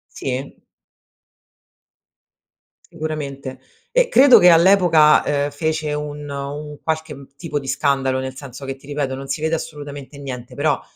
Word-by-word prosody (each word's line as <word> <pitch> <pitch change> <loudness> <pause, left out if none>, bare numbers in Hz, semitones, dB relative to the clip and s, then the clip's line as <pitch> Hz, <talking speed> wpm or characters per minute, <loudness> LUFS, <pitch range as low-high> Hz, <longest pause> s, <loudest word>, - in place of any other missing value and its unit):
Sì. 135 +1 -4 2.3
Sicuramente 140 -5 -6 0.3
e - - +3
credo 265 - +7
che 180 - +6
all'epoca, 170 -3 +6 0.2
uhm, 145 - -2
fece 155 +1 -2
un 150 0 -5
un 145 +1 -6
qualche 160 -3 -4
tipo 155 -2 -3
di 140 - -9
scandalo, 135 -2 0
nel 130 0 -4
senso 135 -1 -10
che 135 0 -5
ti 135 - -19
ripeto 145 -2 -2
non 135 +1 -7
si 145 - -3
vede 160 +1 +1
assolutamente 145 -2 -8
niente 125 -3 -7
però, 145 -1 0
145 Hz, 135 wpm, -20 LUFS, 135-155 Hz, 2.3 s, credo